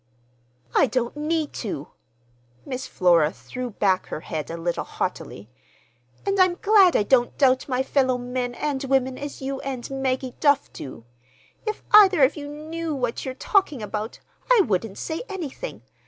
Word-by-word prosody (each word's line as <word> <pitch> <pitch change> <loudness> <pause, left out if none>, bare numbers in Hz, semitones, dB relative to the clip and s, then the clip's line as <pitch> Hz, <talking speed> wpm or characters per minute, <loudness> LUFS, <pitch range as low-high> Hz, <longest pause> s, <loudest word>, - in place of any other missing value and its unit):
"I - - +5
don't 245 0 -1
need 305 0 -1
to!" 170 - -5 0.8
Miss 260 -1 -5
Flora 170 -4 +3
threw 250 +6 -6
back 195 -3 +1
her - - -5
head 155 -2 -5
a 165 - -5
little 170 +1 -2
haughtily. 105 +4 -5 0.7
"And 395 0 0
I'm 370 -1 +5
glad 395 -3 +5
I - - +4
don't 245 +2 +2
doubt 260 -1 +3
my 255 0 +1
fellow 260 -2 +2
men 245 0 -3
and 285 -1 -2
women 265 -1 +1
as 285 0 -7
you 270 0 -3
and 265 -3 -5
Maggie 260 -1 -1
Duff 285 -2 +2
do! 130 -4 -9 0.6
If 430 - -3
either 390 -7 +8
of 265 - +4
you 290 -2 -6
knew 310 +2 -5
what 245 -3 -2
you're 260 -1 -4
talking 305 - +1
about, 210 +1 -4 0.3
I 485 -4 +7
wouldn't 200 - -1
say 320 0 -4
anything. 385 - -6
265 Hz, 160 wpm, -24 LUFS, 235-305 Hz, 0.8 s, either